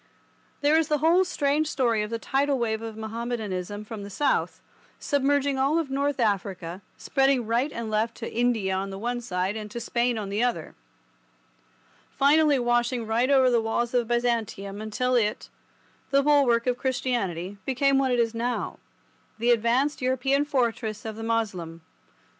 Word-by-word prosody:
There 300 +2 +4
is 320 - 0
the 300 - +1
whole 330 +5 +4
strange 305 -3 0
story 240 -7 +1
of 210 - -3
the 230 - -2
tidal 275 +4 0
wave 220 -2 -1
of 225 -1 -7
Mahommedanism 220 -3 -4
from 215 -1 -7
the 200 - -7
south, 275 +8 0 0.4
submerging 280 -1 +1
all 275 +4 +2
North 280 0 -2
Africa, 195 -5 -1 0.2
spreading 270 -3 +1
right 240 +6 0
and 230 -2 -5
left 220 +2 0
to 230 - -7
India 230 -5 +1
on 190 +1 -2
the 195 - -6
one 240 +3 -3
side 185 -2 -2
and 215 -1 -6
to 235 - -6
Spain 235 +1 0
on 205 -2 -4
the 205 +3 -1
other, 245 0 -1 1.4
finally 295 +1 +4
washing 240 -1 0
right 230 +4 +1
over 260 -2 +5
the 235 -1 +3
walls 230 +2 -1
of 240 -2 +1
Byzantium 225 -4 -1
until 235 +4 -1
it, 215 -4 0 0.6
the 275 0 +3
bulwark 270 -6 +3
of 250 0 0
Christianity, 205 -8 -2
became 270 +1 +2
what 270 -1 +1
it 245 - +1
is 230 -1 +1
now, 240 +2 -3 0.6
the 235 +2 +2
advanced 240 +6 +1
European 260 +3 +1
fortress 230 -6 -1
of 220 -1 -5
the 225 - -8
Moslem. 200 -8 -2
240 Hz, 165 wpm, -26 LUFS, 215-270 Hz, 1.4 s, over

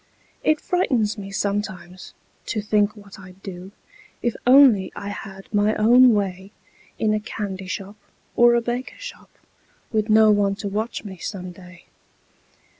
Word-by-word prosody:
It 310 -1 +2
frightens 250 - 0
me 200 -2 -8
sometimes, 195 -2 -4 0.3
to 225 - -2
think 210 0 +1
what 205 -1 -14
I'd 185 0 -15
do, 185 -1 -8 0.5
If 240 -1 0
only 250 -7 +6
I 200 - -6
had 195 -1 -9
my 210 +1 +2
own 240 +2 +6
way 190 -1 -3 0.5
In 215 -1 +1
a 215 - +1
candy 195 -3 -6
shop 195 +2 -6 0.4
or 240 0 +6
a 235 - +2
baker 245 +3 -4
shop, - - -10 0.6
Witn 215 0 0
no 215 0 +6
one 200 -1 +2
to 205 +1 -5
watch 215 +4 -3
me, 195 -3 -9
some 180 0 -6
day. 180 0 -15
205 Hz, 150 wpm, -22 LUFS, 195-220 Hz, 0.6 s, only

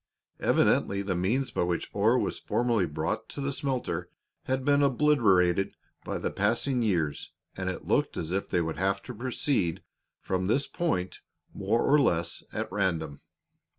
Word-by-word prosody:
Evidently 100 0 +2
the 95 -2 -1
means 115 +10 0
by - - -1
which 85 -1 -1
ore 110 +5 +3
was - - -1
formerly 115 -6 +1
brought 80 +8 -3
to - - -7
the 140 0 -1
smelter 130 - -2 0.4
had 130 0 -1
been 145 0 +4
obliterated 110 - +3 0.3
by - - -3
the - - -2
passing 130 -3 +1
years, 85 -10 -1 0.2
and - - -2
it - - -5
looked - - +1
as 80 - -3
if 95 +1 -2
they 90 - +2
would 80 -1 -3
have 95 +2 0
to 125 - -7
proceed 120 - -1 0.4
from 95 -1 -2
this 135 +7 +2
point 95 - -2 0.3
more 105 +5 0
or 150 +2 +5
less 85 - +1
at - - -3
random. 85 -7 -1
100 Hz, 160 wpm, -28 LUFS, 90-130 Hz, 0.4 s, or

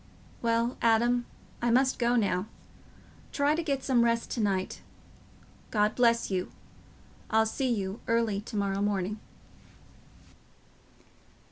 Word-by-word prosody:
Well, 230 +1 0
Adam, 240 +1 +3 0.3
I 240 - +1
must 260 +3 +3
go 240 0 +2
now. 200 -4 +1 0.8
Try 285 +1 +2
to 325 - 0
get 280 -5 -2
some 250 -3 +3
rest 230 0 0
to 235 - -1
night. 195 -3 -1 0.9
God 210 0 +2
bless 235 -3 +2
you. 185 -1 -2 0.8
I'll 220 0 +3
see 260 +4 -1
you 195 -2 -2
early 230 -3 +1
to 220 +1 -9
morrow 200 -1 0
morning." 205 0 -1
230 Hz, 120 wpm, -29 LUFS, 205-240 Hz, 0.9 s, Adam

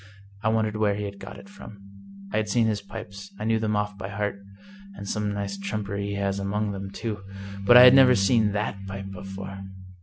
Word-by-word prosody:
I 110 - +1
wondered 110 -1 0
where 105 -2 +2
he 105 - -4
had 100 -1 -6
got 100 - -9
it - - -13
from. 200 - -12 0.6
I - - +1
had 110 -1 -1
seen 115 +2 +3
his 105 -2 0
pipes; 100 -1 -9
I - - -4
knew 110 0 +1
them 110 -1 0
off 105 -1 -2
by 95 - -5
heart 100 0 -2 0.3
— 200 -1 -18
and 100 - -8
some 105 0 -1
nice 100 -1 -4
trumpery 100 0 -3
he 100 - -3
has 100 0 -1
among 105 +2 -1
them, 100 0 -6
too! 105 +1 -5 0.5
but 120 - +9
I 125 - +11
had 125 0 +10
never 130 -2 +7
seen 105 +1 +3
that 105 -1 -2
pipe 95 0 -6
before. 95 +1 -8
105 Hz, 220 wpm, -25 LUFS, 100-110 Hz, 0.6 s, I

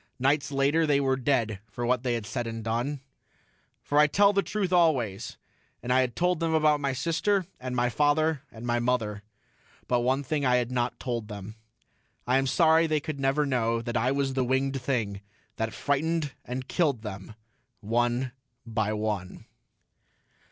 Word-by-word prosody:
Nights 140 +3 +1
later 140 +4 +2
they 145 -1 +3
were 135 -1 +2
dead 120 -6 0
for 120 +4 -4
what 125 0 +2
they 125 -2 0
had 115 -3 -4
said 115 +3 -3
and 115 -1 -5
done. 120 +5 -2 0.8
For 145 - +2
I 150 - +7
tell 200 +6 +4
the 200 - +3
truth 195 -3 -2
always, 135 - +1 0.5
and 125 +1 0
I 130 - +5
had 125 -2 -2
told 180 -1 +1
them 165 -1 +1
about 155 -1 +3
my 140 -1 0
sister 170 +8 0
and 125 0 -4
my 120 0 +2
father 150 +4 +2
and 115 +1 -9
my 120 0 +1
mother. 115 -4 -1 0.7
But 125 - +2
one 130 +3 +1
thing 145 +1 -1
I 125 -2 +3
had 125 0 0
not 125 -1 -1
told 120 -4 -3
them. 105 -1 -8 0.7
I 125 +2 +3
am 135 - 0
sorry 165 +2 +4
they 155 -1 +1
could 145 -1 -5
never 135 +2 +2
know 115 -4 0
I 125 +2 +2
was 135 -1 0
the 130 -1 +1
winged 135 +1 0
thing 110 -7 -2 0.4
that 110 0 -1
frightened 155 +1 -1
and 130 +1 -5
killed 140 -10 0
them, 100 0 -7 0.5
one 120 +3 0 0.3
by 110 -2 -1
one.... 105 -4 -3
130 Hz, 175 wpm, -27 LUFS, 115-145 Hz, 0.8 s, I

